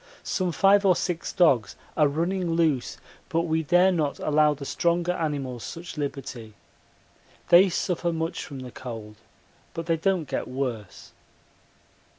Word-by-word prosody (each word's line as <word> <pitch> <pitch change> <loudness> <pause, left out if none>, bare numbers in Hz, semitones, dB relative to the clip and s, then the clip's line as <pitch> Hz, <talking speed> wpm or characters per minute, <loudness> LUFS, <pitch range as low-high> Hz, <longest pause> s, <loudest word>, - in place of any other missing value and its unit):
Some 185 -3 -1
five 195 +4 +4
or 190 -2 +5
six 170 -2 -2
dogs 130 - +3 0.2
are 150 -2 +4
running 170 +4 -1
loose, 160 -6 +1 0.3
but 165 - +1
we 160 -1 0
dare 175 +4 +4
not 155 -5 -1
allow 150 0 +2
the 140 0 -8
stronger 170 +4 0
animals 140 -8 -3
such 165 0 -8
liberty. 130 -7 -6 0.9
They 185 +3 +7
suffer 175 0 -1
much 165 +1 -3
from 135 -3 -8
the 125 -1 -8
cold, 110 -4 -8 0.6
but 165 - -4
they 165 -1 +1
don't 180 -2 0
get - - -3
worse. 125 -6 -5
160 Hz, 145 wpm, -26 LUFS, 135-175 Hz, 0.9 s, They